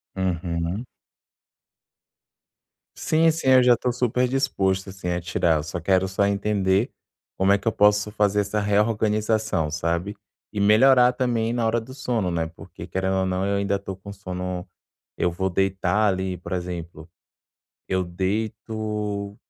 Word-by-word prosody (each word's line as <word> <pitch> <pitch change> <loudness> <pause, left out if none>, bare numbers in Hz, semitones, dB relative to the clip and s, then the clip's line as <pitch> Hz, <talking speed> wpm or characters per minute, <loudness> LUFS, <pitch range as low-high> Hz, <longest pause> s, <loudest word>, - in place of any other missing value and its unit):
Uhum. 90 +3 -2 2.1
Sim, 165 +1 +2
sim, 155 -4 -1
eu 130 -1 +7
já 120 -2 +5
tô 125 - -1
super 125 +1 +1
disposto, 100 -8 0
assim, 95 -2 -6
a 90 0 -1
tirar, 85 -1 +1
eu 75 - -3
só 85 +2 -5
quero 95 +2 +2
só 95 +2 +1
entender 100 +1 +1 0.5
como 95 +1 +3
é 100 - +5
que 100 - -8
eu - - +4
posso 105 0 +3
fazer 105 -1 +2
essa 100 +1 -2
reorganização, 105 -3 +1
sabe? 85 +5 -2 0.4
E 105 - -4
melhorar 125 +4 +5
também 120 -3 0
na 120 -2 0
hora 115 +1 +2
do 125 +4 -11
sono, 115 -9 -1
né, 80 -1 -1
porque - - -11
querendo 95 0 -1
ou 95 - +1
não, 95 +1 -1
eu 100 0 0
ainda 100 0 0
tô 100 -1 -7
com 100 +2 -10
sono 90 -2 -5 0.5
eu 90 - +1
vou 95 +2 -1
deitar 95 +2 +1
ali 95 -1 -1
por 90 - -7
exemplo, 85 -2 -6 0.8
eu 95 0 0
deito 105 +2 -3
100 Hz, 155 wpm, -24 LUFS, 90-110 Hz, 2.1 s, eu